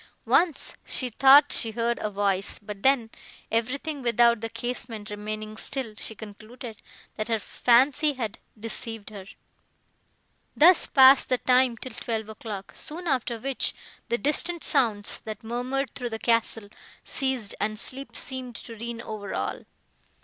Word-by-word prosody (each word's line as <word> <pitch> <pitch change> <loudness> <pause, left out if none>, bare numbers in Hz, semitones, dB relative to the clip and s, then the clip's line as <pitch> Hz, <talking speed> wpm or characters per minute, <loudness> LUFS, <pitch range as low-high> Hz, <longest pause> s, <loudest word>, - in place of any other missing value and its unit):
Once, 335 -5 +2
she 255 - -3
thought 275 +4 +7
she 230 - 0
heard 235 +1 -1
a 215 - -1
voice, 200 -1 0
but 205 -1 -9
then, 255 -3 +3 0.4
everything 270 +6 -1
without 235 -1 +3
the 225 - -3
casement 225 -2 -4
remaining 215 +1 -5
still, 240 0 -4
she 220 - -7
concluded, 220 +2 -10 0.4
that 215 +1 -2
her 225 -1 +1
fancy 260 +7 +3
had 230 -5 -5 0.2
deceived 225 -1 -4
her. 200 -3 -9 1.3
Thus 340 +3 +7
passed 265 -1 +7
the 255 - +3
time, 250 -1 +3
till 255 +1 -8
twelve 220 -2 -4
o'clock, 215 -2 -7
soon 340 +4 -7
after 255 -6 0
which 265 +3 0 0.3
the 235 - +1
distant 325 +7 0
sounds, 210 -4 +1
that 220 +2 -7
murmured 250 +4 -2
through 245 -2 -4
the 225 - -4
castle, 225 -2 0 0.3
ceased, 265 -6 -2
and 215 0 -1
sleep 265 +3 -3
seemed 255 -2 -4
to 230 0 -8
reign 235 +1 -6
over 210 -3 -6
all. - - -3
235 Hz, 145 wpm, -26 LUFS, 215-260 Hz, 1.3 s, thought